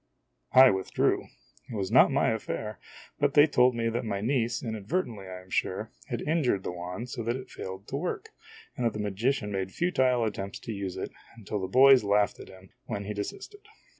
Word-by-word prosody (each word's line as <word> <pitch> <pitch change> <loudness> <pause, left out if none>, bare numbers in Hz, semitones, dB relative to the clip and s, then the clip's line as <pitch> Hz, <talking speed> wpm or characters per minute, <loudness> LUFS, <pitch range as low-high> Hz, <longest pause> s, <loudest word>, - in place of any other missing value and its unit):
I 130 +1 +9
withdrew. 95 -1 0 0.4
It 120 - -6
was 95 -3 -2
not - - +7
my - - +2
affair, 105 0 -4 0.4
but 145 +1 +1
they 145 0 +8
told 125 -4 +3
me 115 0 0
that 115 +1 -2
my 100 -3 -2
niece, 120 +1 0
inadvertently 110 - -3
I 90 0 -8
am 90 0 -20
sure, 105 +5 -1 0.2
had 120 -4 -3
injured 145 - +1
the - - -3
wand 90 +7 -6
so - - -4
that 115 +2 -1
it 130 - -8
failed 95 +2 -7
to 135 - -2
work, 180 - -4 0.5
and 125 - -3
that 115 -2 +1
the 105 - -5
magician 105 +2 -1
made 95 -1 -2
futile 130 - +2
attempts 100 -2 -4
to - - -6
use 100 -3 -4
it, - - -4 0.3
until 105 -1 -4
the 95 - -2
boys 130 +4 +7
laughed 100 0 +2
at - - -10
him, 95 0 -15
when 100 - -4
he 105 - -3
desisted. 410 - -7
110 Hz, 200 wpm, -28 LUFS, 100-130 Hz, 0.5 s, I